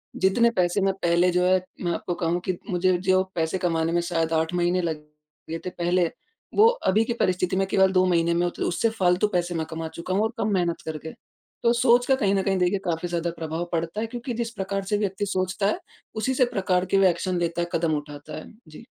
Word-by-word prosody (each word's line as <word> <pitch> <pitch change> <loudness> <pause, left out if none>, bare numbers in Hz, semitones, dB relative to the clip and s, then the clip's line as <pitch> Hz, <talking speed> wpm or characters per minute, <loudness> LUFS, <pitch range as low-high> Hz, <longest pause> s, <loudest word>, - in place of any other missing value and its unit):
जितने 215 +5 +3
पैसे 180 -2 +1
मैं 195 0 +2
पहले 170 +1 +3
जो 180 +1 +2
है 185 0 +3 0.2
मैं 175 - 0
आपको 175 - -3
कहूँ 170 +1 0
कि 185 -2 -1
मुझे 180 0 +2
जो 185 +1 +2
पैसे 165 +2 0
कमाने 165 -3 0
में 175 0 +2
शायद 165 -2 -1
8 160 +1 0
महीने 175 +1 +1
लग 165 -3 -2 0.5
गए 165 - -2
थे - - -1
पहले, 175 -1 +1 0.5
वो 430 +2 +7
अभी 225 - +2
की 235 - -1
परिस्थिति 185 -4 0
में 195 +1 +2
केवल 190 0 +3
2 185 -1 +3
महीने 170 -2 +2
में 170 +1 +1
होते 175 - -3
उससे 205 +6 +1
फ़ालतू 190 -2 +2
पैसे 175 -1 0
कमा 160 0 -4
चुका 170 +3 -5
हूँ 200 +3 +2
और 220 +2 -1
कम 215 -1 0
मेहनत 175 -3 0
करके। 160 0 -6 0.5
तो 235 0 +4
सोच 240 0 +4
का 265 - +4
कहीं 200 -6 +1
न 195 - +2
कहीं 195 0 +1
देखे 180 +2 +2
काफ़ी 170 0 -1
ज़्यादा 170 0 -1
प्रभाव 160 +1 -3
पड़ता 165 +4 -2
है, 225 - -2
क्योंकि 245 +2 -5
जिस 230 0 -3
प्रकार 195 -2 -3
से 205 +2 0
व्यक्ति 205 0 -1
सोचता 185 0 -1
है 210 - 0 0.4
उसी 220 +5 0
से 255 -1 +3
प्रकार 185 -5 0
के - - +6
एक्शन 180 +1 -1
लेता 170 0 -1
कदम 165 -1 +1
उठाता 145 0 -8
है। - - -8 0.2
जी। 155 +9 -13
180 Hz, 225 wpm, -25 LUFS, 170-200 Hz, 0.5 s, वो